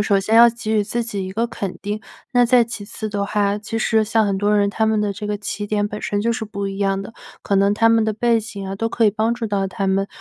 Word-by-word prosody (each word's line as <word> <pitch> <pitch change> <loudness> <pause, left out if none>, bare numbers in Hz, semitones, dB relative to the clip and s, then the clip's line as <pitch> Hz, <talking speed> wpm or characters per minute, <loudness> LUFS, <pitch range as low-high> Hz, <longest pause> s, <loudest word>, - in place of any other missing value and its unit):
首 200 -1 +2
先 215 +3 +1
要 235 +1 +9
给 230 -1 -5
予 210 - +2
自 235 +3 -2
己 205 -5 -4
一 190 - -6
个 225 +4 0
肯 195 -5 -5
定。 210 +1 -3 0.3
那 245 -1 +4
再 245 0 +5
其 230 -3 -6
次 215 +1 -6
的 200 -1 -2
话， 205 0 0
其 210 +2 -5
实 220 0 +2
像 220 +1 +2
很 200 -2 0
多 205 +1 +2
人 200 0 +2
他 220 +2 0
们 220 -1 +2
的 210 -1 0
这 210 +2 -6
个 210 0 -1
起 205 0 -5
点 205 0 0
本 210 +1 -6
身 205 - -1
就 235 +1 +1
是 230 -1 -3
不 200 -2 -4
一 195 0 -6
样 195 -1 0
的， 200 - -10 0.3
可 200 - 0
能 200 +1 +3
他 225 +2 +4
们 225 -1 +4
的 220 - 0
背 230 +2 +2
景 210 -3 -7
啊， 195 - -4
都 225 +3 -1
可 230 0 +1
以 210 - +5
帮 220 +3 0
助 240 -1 -5
到 200 -3 0
他 195 +1 -2
们， 195 +1 +1
210 Hz, 320 characters per minute, -20 LUFS, 200-225 Hz, 0.3 s, 要